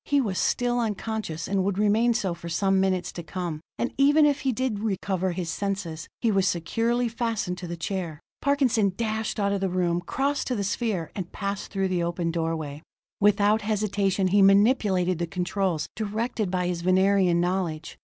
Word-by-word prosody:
He 285 Hz, -1 st, +2 dB
was 205 Hz, -8 st, -1 dB
still 245 Hz, 0 st, +1 dB
unconscious, 215 Hz, -6 st, -3 dB
and 195 Hz, 0 st, +1 dB
would 195 Hz, 0 st, -1 dB
remain 220 Hz, +3 st, +3 dB
so 195 Hz, -6 st, 0 dB
for 170 Hz, 0 st, -8 dB
some 195 Hz, +3 st, +2 dB
minutes 185 Hz, -2 st, 0 dB
to 175 Hz, -, -6 dB
come. 170 Hz, -2 st, -5 dB, 0.2 s
And 240 Hz, -, -2 dB
even 290 Hz, +2 st, +6 dB
if 290 Hz, -1 st, +2 dB
he 270 Hz, -, 0 dB
did 250 Hz, -3 st, -1 dB
recover 190 Hz, -3 st, -1 dB
his 175 Hz, -2 st, -3 dB
senses, 190 Hz, -4 st, -3 dB
he 230 Hz, -, +2 dB
was 195 Hz, -1 st, +2 dB
securely 230 Hz, +8 st, 0 dB
fastened 225 Hz, -6 st, -2 dB
to 175 Hz, -, -6 dB
the 170 Hz, 0 st, -5 dB
chair; 170 Hz, -3 st, -4 dB, 0.2 s
Parkinson 255 Hz, -8 st, +2 dB
dashed 220 Hz, -1 st, -2 dB
out 200 Hz, -1 st, +1 dB
of 200 Hz, -1 st, -1 dB
the 195 Hz, -, +1 dB
room, 175 Hz, -1 st, 0 dB
crossed 275 Hz, +10 st, -1 dB
to 250 Hz, -, 0 dB
the 205 Hz, -, -1 dB
sphere, 200 Hz, -4 st, -2 dB
and 185 Hz, -3 st, -5 dB
passed 200 Hz, -1 st, -4 dB
through 195 Hz, -1 st, -1 dB
the 180 Hz, -2 st, 0 dB
open 170 Hz, 0 st, -1 dB
doorway. 160 Hz, -3 st, -3 dB, 0.4 s
Without 205 Hz, +1 st, +4 dB
hesitation 200 Hz, -2 st, 0 dB
he 200 Hz, +2 st, +4 dB
manipulated 195 Hz, -3 st, +4 dB
the 170 Hz, -, -1 dB
controls, 180 Hz, -2 st, -1 dB
directed 220 Hz, 0 st, -2 dB
by 180 Hz, -1 st, 0 dB
his 175 Hz, -1 st, -2 dB
Venerian 185 Hz, -1 st, +3 dB
knowledge. 175 Hz, -3 st, -2 dB
195 Hz, 185 wpm, -26 LUFS, 175-220 Hz, 0.4 s, even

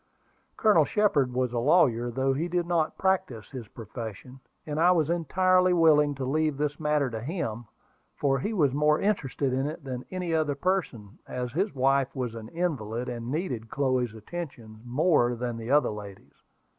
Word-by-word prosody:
Colonel 210 Hz, -8 st, +5 dB
Shepard 150 Hz, -7 st, +2 dB
was 125 Hz, -1 st, -1 dB
a 120 Hz, -, 0 dB
lawyer, 120 Hz, -4 st, +3 dB
though 135 Hz, +3 st, 0 dB
he 155 Hz, +6 st, -1 dB
did 175 Hz, 0 st, -1 dB
not 170 Hz, -3 st, 0 dB
practise 190 Hz, -, -1 dB
his 125 Hz, -5 st, -7 dB
profession, 115 Hz, +3 st, -8 dB, 0.3 s
and 150 Hz, 0 st, -3 dB
I 170 Hz, +2 st, +5 dB
was 165 Hz, -3 st, +2 dB
entirely 185 Hz, +2 st, +3 dB
willing 150 Hz, -4 st, +4 dB
to 135 Hz, -1 st, -4 dB
leave 155 Hz, +1 st, 0 dB
this 145 Hz, 0 st, -2 dB
matter 150 Hz, -4 st, +1 dB
to 110 Hz, -1 st, -4 dB
him, 120 Hz, -, -4 dB, 0.5 s
for 135 Hz, -1 st, +1 dB
he 205 Hz, -, -2 dB
was 150 Hz, -, +2 dB
more 150 Hz, +1 st, +3 dB
interested 140 Hz, -9 st, 0 dB
in 135 Hz, +2 st, 0 dB
it 155 Hz, +1 st, -6 dB
than 130 Hz, -2 st, -5 dB
any 180 Hz, -3 st, -3 dB
other 155 Hz, -3 st, +1 dB
person, 140 Hz, -, -2 dB
as 125 Hz, -1 st, -4 dB
his 190 Hz, -, -1 dB
wife 135 Hz, +1 st, +2 dB
was 125 Hz, -4 st, -3 dB
an 115 Hz, -1 st, -8 dB
invalid, 125 Hz, -9 st, -2 dB
and 120 Hz, -1 st, -5 dB
needed 130 Hz, -7 st, -3 dB
Chloe's 130 Hz, -4 st, 0 dB
attentions 115 Hz, -3 st, -8 dB
more 125 Hz, -1 st, +2 dB
than 120 Hz, 0 st, -3 dB
the 115 Hz, +1 st, -7 dB
other 145 Hz, -3 st, +3 dB
ladies. 100 Hz, -2 st, -10 dB
140 Hz, 175 wpm, -27 LUFS, 120-165 Hz, 0.5 s, Colonel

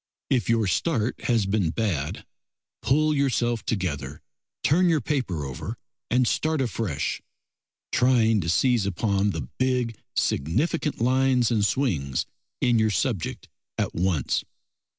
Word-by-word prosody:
If 120 Hz, -7 st, +1 dB
your 115 Hz, -2 st, +3 dB
start 120 Hz, -, 0 dB
has 115 Hz, -5 st, +2 dB
been 95 Hz, -3 st, +1 dB
bad, 85 Hz, -7 st, -2 dB, 0.6 s
pull 155 Hz, +3 st, +2 dB
yourself 120 Hz, -5 st, +1 dB
together, 75 Hz, -, -3 dB, 0.4 s
turn 175 Hz, +5 st, +4 dB
your 160 Hz, -2 st, +3 dB
paper 120 Hz, -, -2 dB
over 65 Hz, -2 st, -6 dB, 0.3 s
and 125 Hz, 0 st, +3 dB
start 155 Hz, +4 st, 0 dB
afresh, 105 Hz, -, -2 dB, 0.7 s
trying 115 Hz, -4 st, +3 dB
to 85 Hz, -, -3 dB
seize 120 Hz, +2 st, +2 dB
upon 100 Hz, +1 st, +1 dB
the 80 Hz, -10 st, -4 dB
big, 125 Hz, -3 st, +1 dB, 0.2 s
significant 140 Hz, -, 0 dB
lines 125 Hz, -1 st, +3 dB
and 110 Hz, -3 st, +2 dB
swings 85 Hz, -, 0 dB, 0.4 s
in 120 Hz, -3 st, +3 dB
your 110 Hz, 0 st, +3 dB
subject 105 Hz, -, -2 dB, 0.3 s
at -, -, -1 dB
once. 85 Hz, -5 st, 0 dB
115 Hz, 125 wpm, -25 LUFS, 95-130 Hz, 0.7 s, turn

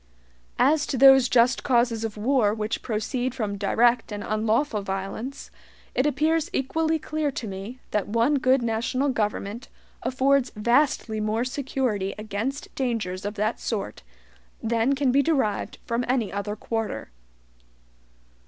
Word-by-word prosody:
As 295 Hz, +4 st, +3 dB
to 270 Hz, -, -2 dB
those 270 Hz, -1 st, +7 dB
just 245 Hz, +1 st, +4 dB
causes 235 Hz, -3 st, +2 dB
of 220 Hz, -1 st, -4 dB
war 220 Hz, -2 st, +2 dB
which 215 Hz, 0 st, -3 dB
proceed 245 Hz, +3 st, -2 dB
from 210 Hz, -5 st, -2 dB
direct 230 Hz, +4 st, +2 dB
and 205 Hz, 0 st, -4 dB
unlawful 220 Hz, +2 st, 0 dB
violence, 195 Hz, +7 st, -5 dB, 0.4 s
it 260 Hz, -, +2 dB
appears 310 Hz, +3 st, +1 dB
equally 320 Hz, +4 st, 0 dB
clear 310 Hz, -1 st, -2 dB
to 235 Hz, -, -5 dB
me 195 Hz, +5 st, -7 dB
that 210 Hz, -, 0 dB
one 235 Hz, +7 st, +2 dB
good 255 Hz, 0 st, +3 dB
national 235 Hz, +5 st, 0 dB
government 210 Hz, -1 st, -2 dB, 0.3 s
affords 265 Hz, 0 st, +2 dB
vastly 235 Hz, 0 st, +1 dB
more 215 Hz, +2 st, 0 dB
security 255 Hz, -7 st, -2 dB
against 215 Hz, +6 st, -4 dB
dangers 220 Hz, -8 st, -2 dB
of 205 Hz, +1 st, -3 dB
that 215 Hz, +2 st, -1 dB
sort 200 Hz, -, -4 dB, 0.6 s
than 230 Hz, +4 st, +2 dB
can 270 Hz, -2 st, +2 dB
be 275 Hz, +2 st, +4 dB
derived 275 Hz, -10 st, 0 dB
from 235 Hz, +1 st, -1 dB
any 245 Hz, -4 st, 0 dB
other 205 Hz, +1 st, -3 dB
quarter. 220 Hz, -, -4 dB
235 Hz, 135 wpm, -25 LUFS, 215-265 Hz, 0.6 s, those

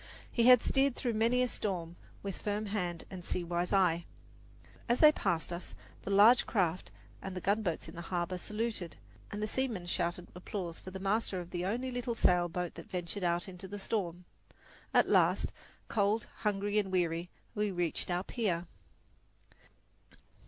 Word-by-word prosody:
He 235 Hz, 0 st, +3 dB
had 250 Hz, -2 st, +8 dB
steered 270 Hz, -1 st, +2 dB
through 240 Hz, -3 st, -1 dB
many 230 Hz, +3 st, +3 dB
a -, -, +2 dB
storm 175 Hz, -7 st, -3 dB, 0.3 s
with 195 Hz, -2 st, -4 dB
firm 210 Hz, +1 st, -2 dB
hand 180 Hz, -5 st, -2 dB
and 185 Hz, -2 st, -7 dB
sea 180 Hz, -, -2 dB
wise 175 Hz, +1 st, -1 dB
eye. 175 Hz, -4 st, +3 dB, 0.8 s
As 240 Hz, -, +3 dB
they 305 Hz, -1 st, +9 dB
passed 170 Hz, -, -1 dB
us, 170 Hz, -, -6 dB, 0.3 s
the -, -, -6 dB
large 210 Hz, +5 st, +7 dB
craft 185 Hz, -5 st, 0 dB, 0.3 s
and 190 Hz, -1 st, -6 dB
the -, -, -2 dB
gunboats 195 Hz, -3 st, 0 dB
in -, -, -9 dB
the 170 Hz, -, -6 dB
harbour 180 Hz, 0 st, -1 dB
saluted 210 Hz, -4 st, -3 dB, 0.3 s
and 205 Hz, +1 st, -4 dB
the -, -, 0 dB
seamen 225 Hz, -6 st, -1 dB
shouted 175 Hz, 0 st, -1 dB
applause 180 Hz, -1 st, -5 dB
for -, -, -9 dB
the 190 Hz, +1 st, -7 dB
master 195 Hz, 0 st, 0 dB
of 175 Hz, -1 st, -8 dB
the 175 Hz, 0 st, -2 dB
only 250 Hz, +5 st, -1 dB
little 245 Hz, -1 st, -2 dB
sail 175 Hz, -4 st, +3 dB
boat 180 Hz, 0 st, -3 dB
that 165 Hz, -, -11 dB
ventured 180 Hz, +2 st, -3 dB
out 175 Hz, +2 st, +1 dB
into 190 Hz, 0 st, -8 dB
the 205 Hz, +2 st, -6 dB
storm. 180 Hz, -4 st, -2 dB, 0.7 s
At -, -, +5 dB
last, -, -, +3 dB, 0.4 s
cold, 210 Hz, +1 st, +1 dB
hungry 205 Hz, 0 st, +1 dB
and 195 Hz, -2 st, -2 dB
weary, 175 Hz, -1 st, 0 dB, 0.2 s
we 210 Hz, 0 st, 0 dB
reached 175 Hz, -3 st, -1 dB
our 175 Hz, +1 st, 0 dB
pier. 190 Hz, -7 st, -1 dB
190 Hz, 170 wpm, -32 LUFS, 175-215 Hz, 0.8 s, they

